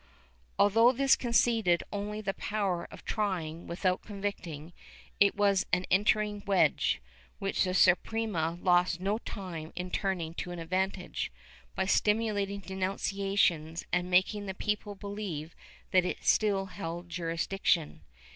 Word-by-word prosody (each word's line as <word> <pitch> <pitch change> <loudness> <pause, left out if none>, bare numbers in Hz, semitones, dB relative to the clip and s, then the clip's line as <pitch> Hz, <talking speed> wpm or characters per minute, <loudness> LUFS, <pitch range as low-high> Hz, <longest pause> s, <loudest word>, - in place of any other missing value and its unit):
^ - - -30 0.5
Although 225 +5 +5
this 270 +1 +4
conceded 230 -7 +2
only 210 +1 -3
the 195 -2 -2
power 195 -6 -2
of - - -13
trying 175 -6 -2
without 180 +1 0
con 205 -2 -9
victing, 170 -5 -5 0.5
it 200 -1 +5
was 200 -2 +2
an 180 0 +2
entering 210 +1 +2
wedge, 185 -6 +3 0.4
which 195 - 0
the 185 -1 -1
Suprema 180 -3 +2
lost 180 -1 +3
no 200 +4 0
time 175 -8 -7
in 180 0 -4
turning 180 -5 -1
to 175 - -5
advantage, 185 +2 -2 0.4
by 190 - 0
stimulating 205 -1 +1
denunciations 190 -3 0
and 180 0 +1
making 195 +3 +2
the 190 - -4
people 210 0 -2
believe 195 -6 -5 0.4
that 185 -1 +5
it 180 - -3
still 200 -3 +3
held 175 -2 -6
jurisdiction. 170 0 -1
190 Hz, 130 wpm, -30 LUFS, 175-205 Hz, 0.5 s, Although